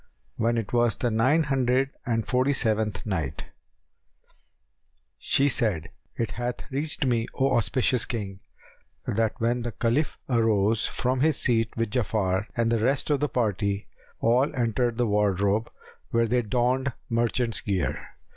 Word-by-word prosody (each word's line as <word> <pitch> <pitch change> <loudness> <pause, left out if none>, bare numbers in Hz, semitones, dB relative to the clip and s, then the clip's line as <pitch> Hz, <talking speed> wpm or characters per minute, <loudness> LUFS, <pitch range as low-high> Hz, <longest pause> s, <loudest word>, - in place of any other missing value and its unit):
When 115 +1 +1
it 115 -1 -3
was 120 -1 +3
the 120 - -1
Nine 130 +9 +3
Hundred 135 -1 +1 0.2
and 115 -2 0
Forty 130 +2 +2
seventh 110 -6 -1
Night, 80 - -3 1.8
She 140 - +2
said, 105 - -1 0.2
It 115 - -2
hath 120 +2 -5
reached 145 +1 0
me, 120 -3 +1
O 135 -1 +2
auspicious 120 +3 +1
King, 100 -5 -5 0.7
that 110 +1 0
when 120 +2 +1
the 120 -1 -4
Caliph 120 +9 0
arose 110 -3 +2
from 130 +1 -1
his 155 +1 +3
seat 115 -3 +2
with 115 -2 -1
Ja'afar 105 -5 0
and 115 0 +2
the 115 -2 +1
rest 135 +4 +1
of 145 - +2
the 150 +1 0
party, 100 -4 -1 0.3
all 125 +5 +3
entered 120 -1 0
the 120 - +2
wardrobe, 105 +1 +1 0.4
where 115 0 +2
they 120 +2 +1
donned 125 +4 0
merchant's 115 -1 0
gear. 95 -4 -2
115 Hz, 145 wpm, -26 LUFS, 110-125 Hz, 1.8 s, was